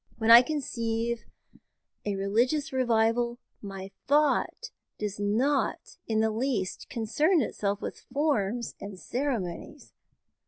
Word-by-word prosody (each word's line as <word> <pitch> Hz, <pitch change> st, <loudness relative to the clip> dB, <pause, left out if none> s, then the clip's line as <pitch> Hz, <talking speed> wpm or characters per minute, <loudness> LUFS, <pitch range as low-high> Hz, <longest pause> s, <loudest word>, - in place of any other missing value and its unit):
When 225 Hz, 0 st, +3 dB
I 235 Hz, +1 st, +12 dB
conceive 235 Hz, -5 st, -2 dB, 0.8 s
a 205 Hz, -, 0 dB
religious 235 Hz, +10 st, +1 dB
revival, 235 Hz, -1 st, +2 dB, 0.2 s
my 195 Hz, -1 st, -7 dB, 0.2 s
thought 300 Hz, -, +2 dB, 0.3 s
does 205 Hz, -1 st, -4 dB
not 245 Hz, +8 st, 0 dB
in 220 Hz, -1 st, +1 dB
the 220 Hz, 0 st, +2 dB
least 225 Hz, -4 st, -2 dB
concern 295 Hz, -, +2 dB
itself 205 Hz, -2 st, -2 dB
with -, -, -7 dB
forms 245 Hz, -6 st, 0 dB
and 200 Hz, -1 st, -7 dB
ceremonies. 245 Hz, -, -4 dB
230 Hz, 110 wpm, -28 LUFS, 205-270 Hz, 0.8 s, I